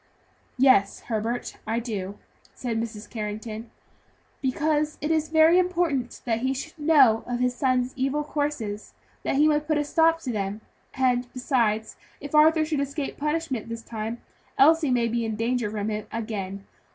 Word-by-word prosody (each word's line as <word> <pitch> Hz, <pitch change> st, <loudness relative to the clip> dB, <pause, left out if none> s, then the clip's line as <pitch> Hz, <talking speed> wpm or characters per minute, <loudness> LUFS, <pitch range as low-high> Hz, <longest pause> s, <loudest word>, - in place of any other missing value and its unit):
"Yes, 255 Hz, -7 st, +4 dB
Herbert, 230 Hz, +1 st, -3 dB
I 225 Hz, +1 st, 0 dB
do," 205 Hz, -4 st, -5 dB, 0.4 s
said 230 Hz, -3 st, -2 dB
Mrs. 225 Hz, -2 st, -6 dB
Carrington, 220 Hz, +1 st, -5 dB, 0.7 s
"because 300 Hz, +2 st, 0 dB
it 300 Hz, -, -1 dB
is 315 Hz, -1 st, +1 dB
very 320 Hz, +2 st, +6 dB
important 340 Hz, -9 st, 0 dB
that 230 Hz, -2 st, 0 dB
he 260 Hz, +2 st, 0 dB
should 315 Hz, +4 st, -7 dB
know 280 Hz, -8 st, +5 dB
of 245 Hz, 0 st, -2 dB
his 250 Hz, 0 st, +1 dB
son's 255 Hz, 0 st, 0 dB
evil 275 Hz, +3 st, 0 dB
courses, 285 Hz, -9 st, -3 dB, 0.3 s
that -, -, -1 dB
he 295 Hz, +2 st, +5 dB
may 300 Hz, -1 st, +3 dB
put 300 Hz, 0 st, -1 dB
a 295 Hz, -, +1 dB
stop 325 Hz, +2 st, +3 dB
to 260 Hz, -, -3 dB
them; 205 Hz, 0 st, -3 dB, 0.3 s
and 250 Hz, -2 st, +1 dB
besides, 230 Hz, -4 st, 0 dB, 0.2 s
if 285 Hz, +1 st, -8 dB
Arthur 310 Hz, +1 st, +5 dB
should 305 Hz, -2 st, -1 dB
escape 280 Hz, +1 st, -3 dB
punishment 300 Hz, -6 st, -2 dB
this 230 Hz, 0 st, -6 dB
time, 225 Hz, +1 st, -5 dB, 0.4 s
Elsie 315 Hz, +1 st, +5 dB
may 240 Hz, -2 st, +2 dB
be 235 Hz, +1 st, -1 dB
in 220 Hz, -1 st, -2 dB
danger 230 Hz, 0 st, 0 dB
from 210 Hz, 0 st, -3 dB
him 210 Hz, 0 st, -4 dB
again. 200 Hz, -4 st, -4 dB
250 Hz, 165 wpm, -25 LUFS, 225-300 Hz, 0.7 s, very